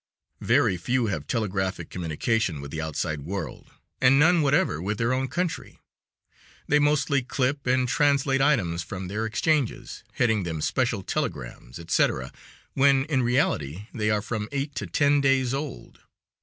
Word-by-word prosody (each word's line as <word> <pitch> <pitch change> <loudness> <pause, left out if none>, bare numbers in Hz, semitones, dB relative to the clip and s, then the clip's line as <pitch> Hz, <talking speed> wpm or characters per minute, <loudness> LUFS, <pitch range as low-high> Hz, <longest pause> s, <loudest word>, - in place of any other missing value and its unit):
Very 90 - +2
few 120 +7 0
have 75 -3 -5
telegraphic 95 -4 -2
communication 90 +2 -1
with 70 0 -8
the 80 - -3
outside 75 -1 -3
world, 95 +7 -6 0.3
and 130 +1 +6
none 165 +3 +5
whatever 140 - +2
with 105 +3 -2
their 115 +3 +1
own 130 +1 0
country. 175 +3 -3 0.9
They 150 - +4
mostly 145 -1 +2
clip 130 +2 -2
and 130 0 +2
translate 140 0 +2
items 100 - +2
from 90 +2 -6
their 110 +3 -2
exchanges, 140 +3 -1
heading 110 -3 +2
them 80 -3 -4
"Special 115 +4 0
telegrams," 70 - -4
etc., 80 -6 0 0.4
when 135 0 +4
in 145 -4 +1
reality 105 - 0
they 110 -3 -1
are 105 -1 +1
from 110 0 -4
eight 140 +1 -3
to - - -3
ten 145 0 +3
days 135 -2 +2
old. 140 0 -6
120 Hz, 150 wpm, -25 LUFS, 90-140 Hz, 0.9 s, and